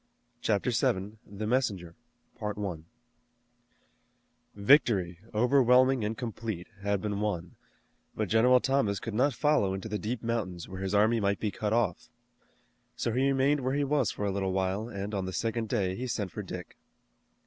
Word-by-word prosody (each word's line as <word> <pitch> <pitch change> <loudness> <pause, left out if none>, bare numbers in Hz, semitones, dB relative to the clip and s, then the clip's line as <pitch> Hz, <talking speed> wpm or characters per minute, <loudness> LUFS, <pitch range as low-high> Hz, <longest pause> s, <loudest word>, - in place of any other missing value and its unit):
CHAPTER 105 +3 +1
VII. 105 -2 0
THE 100 +2 -5
MESSENGER 105 -8 0 2.6
Victory, 100 - +3
overwhelming 125 +1 +4
and 105 +1 -2
complete, 110 -6 -4 0.2
had 100 0 -1
been 105 -1 -2
won, 90 -5 -3 0.6
but 110 - -1
General 125 +5 +5
Thomas 135 -7 +1
could 115 - -5
not 130 +6 +2
follow 145 -11 +2
into 95 +3 -5
the 105 -1 -3
deep 115 +2 -3
mountains 100 -7 -2
where 95 0 -7
his 95 +1 -1
army 110 +3 +4
might 100 -1 0
be 105 - -1
cut 105 0 -3
off. 110 -6 0 0.9
So 115 - -1
he 130 +4 +2
remained 140 +2 +2
where 130 +1 -1
he 145 - +1
was 145 +1 +1
for 105 - -3
a 100 - 0
little 95 -1 -1
while 95 +4 -1
and 100 -1 -5
on 95 -2 -1
the 95 - -5
second 115 +1 -2
day 95 -6 0
he 125 +5 -4
sent 110 -6 -2
for 105 - -5
Dick. 90 -3 -8
105 Hz, 160 wpm, -29 LUFS, 95-125 Hz, 2.6 s, General